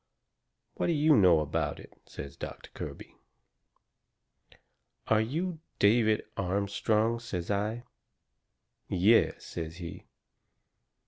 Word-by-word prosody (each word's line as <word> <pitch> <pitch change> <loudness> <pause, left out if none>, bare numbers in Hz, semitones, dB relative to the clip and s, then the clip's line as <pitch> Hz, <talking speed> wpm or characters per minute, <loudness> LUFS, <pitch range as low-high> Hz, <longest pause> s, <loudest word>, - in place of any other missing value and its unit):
"What - - 0
do 170 - +2
you 155 0 +5
know 90 -7 +6
about 75 0 -2
it?" - - -13
says 70 0 -8
Doctor - - -8
Kirby. - - -8 1.9
"Are 110 -1 +3
you 160 +9 -2 0.2
David 110 +1 +4
Armstrong?" 100 +4 0
says 95 -6 -4
I. 105 +4 -1 1.0
"Yes," 100 +5 +3
says 80 -1 -6
he. 85 -2 -8
105 Hz, 100 wpm, -30 LUFS, 90-115 Hz, 1.9 s, know